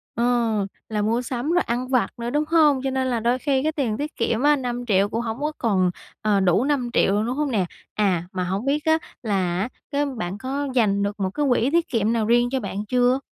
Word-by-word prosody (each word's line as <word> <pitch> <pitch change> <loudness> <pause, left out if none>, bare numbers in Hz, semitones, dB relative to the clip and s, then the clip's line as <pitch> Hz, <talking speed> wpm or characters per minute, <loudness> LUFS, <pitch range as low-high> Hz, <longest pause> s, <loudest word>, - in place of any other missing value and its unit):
Ờ. 235 - 0 0.6
Là 210 -1 -1
mua 230 +4 +1
sắm 250 +4 -3
rồi 355 - +3
ăn 245 +2 -2
vặt 255 -2 +1
nữa, 235 0 -3
đúng 295 +3 +1
hông? 305 -4 +4
Cho 270 - 0
nên 260 0 0
là 245 -3 0
đôi 240 +3 +1
khi 270 -1 +1
cái 310 +2 0
tiền 265 -9 -1
tiết 300 +1 -4
kiệm 230 0 0
á, 295 +1 +5
5.000.000 240 -6 0
cũng 225 +2 -2
hổng 230 +1 -4
có 300 +1 -1
còn, 190 -5 +2 0.3
ờ, 210 -2 +2
đủ 190 +4 +3
5.000.000 255 -8 +1
rồi, 210 +1 +1
đúng 250 +2 -2
hông 295 -1 0
nè? 210 -6 +1 0.3
À, 190 -5 +1
mà 185 -1 -2
hổng 190 +5 -2
biết 290 +2 0
á, 320 0 +4 0.2
là 190 -6 0
á, 205 - -1 0.2
cái 290 0 0
bạn 205 -8 -4
có 275 +4 -3
dành 205 -5 +2
được 205 +1 -3
một 190 -1 0
cái 290 +9 -1
quỹ 245 0 +2
tiết 340 0 +2
kiệm 225 -2 +1
nào 225 -2 0
riêng 240 +1 +3
cho 265 - 0
bạn 200 -1 -4
chưa? 250 +3 +3
240 Hz, 245 wpm, -23 LUFS, 210-270 Hz, 0.6 s, á